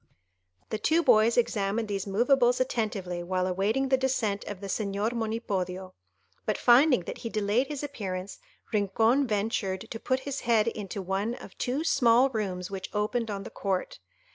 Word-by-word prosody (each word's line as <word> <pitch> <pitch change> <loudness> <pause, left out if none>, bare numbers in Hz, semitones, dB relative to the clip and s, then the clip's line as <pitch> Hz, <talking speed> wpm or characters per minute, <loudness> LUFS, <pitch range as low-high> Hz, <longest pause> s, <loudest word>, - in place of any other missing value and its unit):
The 215 - -2
two 325 +8 +2
boys 220 -1 +5
examined 220 -2 +1
these 200 -1 -3
moveables 245 +4 +3
attentively 210 -8 -2
while 185 +1 -1
awaiting 205 +9 0
the 265 - +4
descent 240 -6 0
of 205 -2 -6
the 200 - -7
Señor 200 +2 -1
Monipodio, 195 -5 -3 0.5
but 215 - -1
finding 255 - +5
that - - -7
he 230 - -5
delayed 215 +4 +1
his 295 -1 -5
appearance, 195 -9 -5 0.3
Rincon 220 +6 +2
ventured 200 -3 -1
to 225 - -5
put 260 +3 0
his 280 0 -4
head 230 -2 +2
into 200 -3 -4
one 195 +5 -1
of - - -12
two 265 +5 -1
small 255 -4 +4
rooms 190 -4 -3
which 190 -1 -5
opened 225 +2 0
on 200 -1 -4
the - - -9
court. 190 - -2
215 Hz, 165 wpm, -28 LUFS, 195-245 Hz, 0.5 s, boys